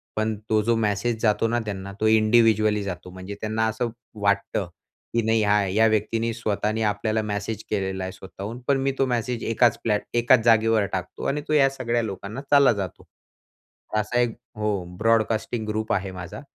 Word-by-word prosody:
पण 110 0 0
तो 110 -1 +3
जो 115 +2 +2
मेसेज 110 +1 0
जातो 110 0 +2
ना 120 +1 0
त्यांना 100 -2 -5
तो 110 - +2
इंडिव्हिज्युअली 110 -1 +4
जातो. 90 -2 -6
म्हणजे 95 +2 -8
त्यांना 110 +1 0
असं 110 +2 -1 0.3
वाटतं, 100 -1 0 0.5
की 115 - +2
नाही 110 0 +3 0.3
या 110 +1 +5
व्यक्तीने 110 +2 0
स्वतःने 110 -1 -1
आपल्याला 110 +1 0
मेसेज 105 +1 -4
केलेला 95 -2 -2
आहे 95 - -4
स्वतःहून. 95 +4 -8
पण 140 - +3
मी 135 0 +1
तो 135 - +4
मेसेज 120 -1 -2
एकाच 115 +1 +3
प्लॅट 105 -2 +1 0.2
एकाच 120 +1 +5
जागेवर 115 -2 +4
टाकतो. 95 -2 -4
आणि 145 +1 -1
तो 155 - 0
या 140 -2 +5
सगळ्या 120 -3 -1
लोकांना 105 +3 -5
चालला 140 -3 +7
जातो. 95 -4 -6 0.9
असा 105 +3 0
एक 120 -1 +2 0.3
हो 105 -3 -1
ब्रॉडकास्टिंग 115 +1 +1
ग्रुप 110 +1 -1
आहे 95 0 -1
माझा. 90 - -8
110 Hz, 170 wpm, -24 LUFS, 100-115 Hz, 0.9 s, चालला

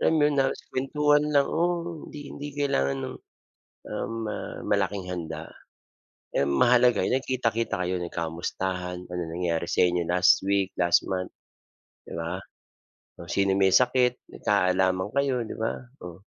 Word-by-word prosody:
yan 160 - +3
mga 150 0 +4
na 135 - +5 0.3
kuwentuhan 145 +2 +2
lang 140 -1 +5
oo, 170 -1 -1
hindi, 150 - -9
hindi 145 +1 -6
kailangan 70 - +1
ng, - - -5 0.7
um, 115 - -3
ah, - - -5
malaking 100 -2 0
handa. 85 -3 -5 0.9
Ang 70 0 +2
mahalaga 125 - +5
nagkita-kita 120 -3 0
kayo, 90 +1 -1
nagkamustahan, 90 +2 -3
ano 90 0 -3
nangyari 85 0 -1
sa - - +1
inyo 90 -1 +2
last 90 +2 +4
week, 100 -1 +2
last 85 -1 +4
month, 90 -1 -2 0.7
'di - - -9
ba? 85 +2 -3 0.8
Kung 85 -1 -8
sino 100 -1 +2
may 95 -1 +4
sakit, 125 -1 +3
magkaalaman 95 -1 +1
kayo, 140 -2 +2
'di - - -6
ba, 110 0 0 0.3
oh. 90 +1 -9
95 Hz, 140 wpm, -26 LUFS, 90-130 Hz, 0.9 s, na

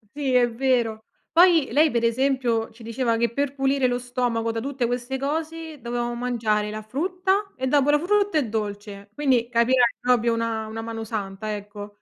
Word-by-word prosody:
Sì, 275 -3 -1
è 245 -1 +5
vero. 230 -3 0 0.3
Poi 335 -4 +5
lei 300 +3 +4
per 235 -1 0
esempio 240 -2 +1
ci 225 +1 -16
diceva 230 0 -1
che 235 0 0
per 280 +1 -1
pulire 270 -1 +1
lo 245 0 0
stomaco 245 -2 -1
da 225 0 -2
tutte 270 -1 -3
queste 245 +2 -2
cose 315 +1 -4
dovevamo 240 0 -3
mangiare 230 -4 0
la 215 +1 -5
frutta, 370 - -1
e 260 0 -3
dopo 285 +1 +3
la 295 0 +5
frutta 405 +2 +1
il 270 -8 +1
dolce, 205 -1 -5
quindi 255 -5 +1
capirai, 240 0 +3
proprio 240 -2 +2
una 225 -1 -2
una 225 +1 -6
mano 225 0 -5
santa, 210 -1 -4
ecco. 205 0 -9
245 Hz, 180 wpm, -24 LUFS, 225-275 Hz, 0.3 s, è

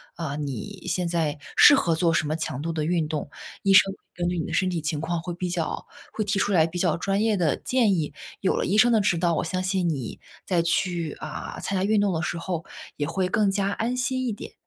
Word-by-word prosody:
啊， 155 -4 -4
你 140 -7 -5
现 180 0 0
在 165 -3 0 0.2
适 290 - +9
合 170 -11 +2
做 165 0 +2
什 160 - +1
么 155 - -1
强 145 -4 -3
度 165 +2 -2
的 155 -1 -1
运 165 0 0
动。 150 -2 -4 0.3
医 195 - +3
生 195 0 +6 0.2
根 175 0 -1
据 180 - -2
你 160 - -2
的 170 - -6
身 185 +3 +2
体 175 -2 -1
情 155 -1 -2
况 170 +1 -1
会 175 0 -5
比 180 +1 -3
较 175 -2 -3 0.3
会 215 - -1
提 200 0 -1
出 205 - +1
来 160 -3 +4
比 170 +2 -6
较 175 -3 +2
专 195 +4 0
业 220 -1 +2
的 165 -5 +2
建 240 -6 +2
议。 155 -4 -2 0.3
有 190 - +2
了 - - 0
医 200 - +1
生 240 +3 +6
的 220 - +4
指 180 -3 +2
导， 170 0 +2
我 - - 0
相 185 +2 -2
信 185 -2 0
你 135 -7 -4 0.3
再 175 -3 +2
去， 170 -1 0
啊， - - -6
参 195 - -2
加 185 - 0
运 210 +1 +3
动 200 -2 +2
的 160 - -1
时 175 0 -2
候 170 -1 -3 0.3
也 145 - -2
会 185 +2 0
更 205 +1 +2
加 200 0 0
安 235 +4 -2
心 255 0 0
一 240 - 0
点。 205 - -8
175 Hz, 275 characters per minute, -25 LUFS, 160-195 Hz, 0.3 s, 适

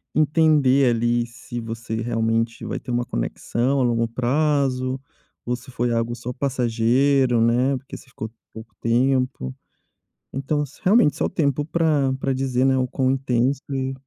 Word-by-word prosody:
entender 150 -4 +4
ali 120 +1 +1
se 120 0 -8
você 115 0 -5
realmente 115 0 -1
vai - - -3
ter - - -12
uma 120 0 0
conexão 120 - -1
a - - +3
longo 115 -1 +1
prazo, 130 +1 0 0.5
ou 125 - 0
se 130 +2 -13
foi 120 0 -1
algo 115 +1 -1
só 125 +1 -6
passageiro, 125 0 +2
né, 125 +4 +2
porque 130 - -10
você - - -13
ficou 110 -2 -6 0.2
pouco 110 0 -11
tempo. 125 - 0 0.8
Então 140 +3 -1
s 145 0 -11
realmente 195 -5 +4
só - - -1
o - - -1
tempo 145 -2 0
pra 155 -4 +1
pra 135 0 0
dizer, 130 -1 0
né, 135 0 +3
o 130 -1 +1
quão 130 +1 0
intenso 130 0 0
e 135 -1 -2
125 Hz, 160 wpm, -23 LUFS, 120-135 Hz, 0.8 s, entender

